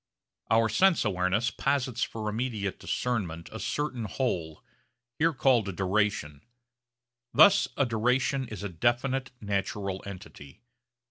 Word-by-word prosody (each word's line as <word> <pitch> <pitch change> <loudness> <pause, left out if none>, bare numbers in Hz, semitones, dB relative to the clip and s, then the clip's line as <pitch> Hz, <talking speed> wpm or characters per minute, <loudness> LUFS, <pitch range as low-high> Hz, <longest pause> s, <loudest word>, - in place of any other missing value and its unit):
Our 115 0 +4
sense 170 - +3
awareness 95 +3 +1
posits 130 -1 -1
for 110 -2 -2
immediate 105 -3 -2
discernment 90 -10 -2
a 110 - -6
certain 130 -5 -2
whole, 85 - -3 0.6
here 165 +2 +4
called 125 -8 +2
a - - -2
'duration'; 95 -6 -1 0.9
thus 200 0 +7
a 140 - +3
duration 125 +3 +1
is 105 -3 -7
a 100 - -3
definite 120 - 0
natural 100 -1 -2
entity. 90 - -11
110 Hz, 120 wpm, -28 LUFS, 95-125 Hz, 0.9 s, thus